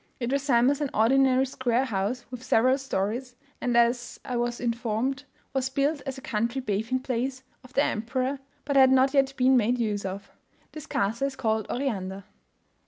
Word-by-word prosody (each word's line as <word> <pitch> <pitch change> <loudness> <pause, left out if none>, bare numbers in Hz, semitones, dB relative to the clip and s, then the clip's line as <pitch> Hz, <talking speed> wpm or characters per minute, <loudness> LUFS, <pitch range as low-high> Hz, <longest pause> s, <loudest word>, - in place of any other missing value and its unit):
It 240 0 -2
resembles 275 0 +2
an 290 - 0
ordinary 260 +3 +4
square 255 -1 0
house 230 +2 -2
with 250 -2 -7
several 255 +2 +3
stories; 245 +1 -3 0.3
and, 245 -1 +1
as 235 +1 +1
I 250 - -3
was 240 0 -1
informed, 240 +3 -2 0.3
was 265 -1 0
built 280 +2 0
as 270 0 -4
a - - -9
country 235 +3 -1
bathing 225 +2 -1
place 260 +1 -3 0.2
of 255 0 -16
the 280 - +3
emperor, 255 +5 -1 0.3
but 280 0 -1
had 265 -1 +7
not 265 +1 +4
yet 275 -1 +3
been 260 +1 +4
made 240 +2 +2
use 210 -4 -1
of. 195 +1 -6 0.4
This 310 -2 -9
castle 225 +7 0
is 275 - -6
called 220 -4 -1
Oriander. 200 -7 -3
250 Hz, 170 wpm, -27 LUFS, 230-265 Hz, 0.4 s, had